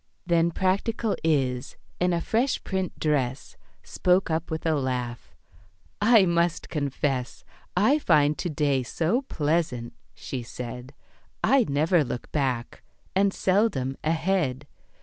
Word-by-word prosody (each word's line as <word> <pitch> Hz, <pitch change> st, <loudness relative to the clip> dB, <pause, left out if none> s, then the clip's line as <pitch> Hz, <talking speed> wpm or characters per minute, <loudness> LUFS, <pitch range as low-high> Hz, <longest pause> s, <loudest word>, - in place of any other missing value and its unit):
Then 170 Hz, -1 st, +3 dB
practical 200 Hz, +5 st, 0 dB
Is, 130 Hz, -6 st, 0 dB, 0.2 s
in 180 Hz, 0 st, +2 dB
a 170 Hz, -1 st, 0 dB
fresh 240 Hz, +8 st, 0 dB
print 190 Hz, -2 st, -3 dB
dress, 135 Hz, -4 st, -1 dB, 0.3 s
Spoke 180 Hz, -1 st, +1 dB
up 160 Hz, +1 st, -1 dB
with 160 Hz, 0 st, -4 dB
a 160 Hz, -, +3 dB
laugh, 125 Hz, -4 st, -3 dB, 0.7 s
"I 220 Hz, -2 st, +6 dB
must 170 Hz, -1 st, 0 dB
confess 140 Hz, -3 st, -2 dB, 0.3 s
"I 260 Hz, +11 st, +4 dB
find 150 Hz, -, +3 dB
to 175 Hz, -, -2 dB
day 145 Hz, -3 st, +1 dB
so 165 Hz, -, 0 dB
pleasant," 150 Hz, -, -1 dB, 0.2 s
she 130 Hz, -, -5 dB
said, 125 Hz, +3 st, -8 dB, 0.5 s
"I 270 Hz, -3 st, +4 dB
never 155 Hz, +4 st, +3 dB
look 125 Hz, -2 st, -6 dB
back, 130 Hz, -5 st, -2 dB, 0.3 s
and 195 Hz, +1 st, +3 dB
seldom 185 Hz, -, +1 dB
ahead. 160 Hz, -4 st, 0 dB
160 Hz, 125 wpm, -26 LUFS, 135-185 Hz, 0.7 s, I